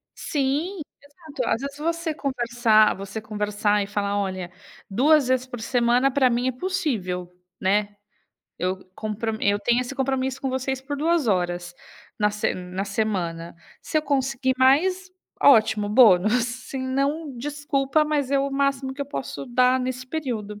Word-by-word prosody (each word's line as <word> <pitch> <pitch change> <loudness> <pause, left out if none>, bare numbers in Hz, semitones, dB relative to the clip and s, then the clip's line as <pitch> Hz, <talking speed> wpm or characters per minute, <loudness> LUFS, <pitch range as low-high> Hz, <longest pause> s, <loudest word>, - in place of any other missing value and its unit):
Sim, 300 +7 -1 0.2
exato. 295 +1 -9
Às 230 - 0
vezes, 280 0 -6
você 335 +1 -2
conversar 240 -6 +2
você 200 +3 -6
conversar 210 -1 0
e - - -7
falar: 205 0 -1
"Olha, 185 -3 -3 0.4
2 275 +7 +4
vezes 255 0 +1
por 245 -3 -8
semana 245 +2 +2
pra 260 -1 +3
mim 245 +1 0
é - - +2
possível, 245 - -2 0.3
né, 205 +2 +1 0.6
eu 185 +1 -2
compro 220 +1 -3
eu 205 0 +2
tenho 240 +4 +2
esse 250 +2 -5
compromisso 265 -1 -1
com 270 - -2
vocês 260 0 -2
por 285 +2 -5
2 325 -1 +1
horas 175 -3 -1 0.4
na 210 0 +2
se 210 0 -1
na 185 +2 -5
semana, 185 -5 -2 0.3
se 310 - 0
eu - - -2
conseguir 270 -2 0
mais, 365 +9 +3 0.3
ótimo, 220 -5 +5
bônus, 215 0 +5
se 255 +3 -6
não, 275 +2 -2
desculpa, 290 +2 0
mas 295 -3 -1
é 280 - +3
o 275 0 0
máximo 275 -1 0
que 285 - -9
eu - - -8
posso 275 -1 -5
dar 250 +1 +3
nesse 255 0 -4
período". 235 -8 -4
255 Hz, 155 wpm, -24 LUFS, 210-275 Hz, 0.6 s, ótimo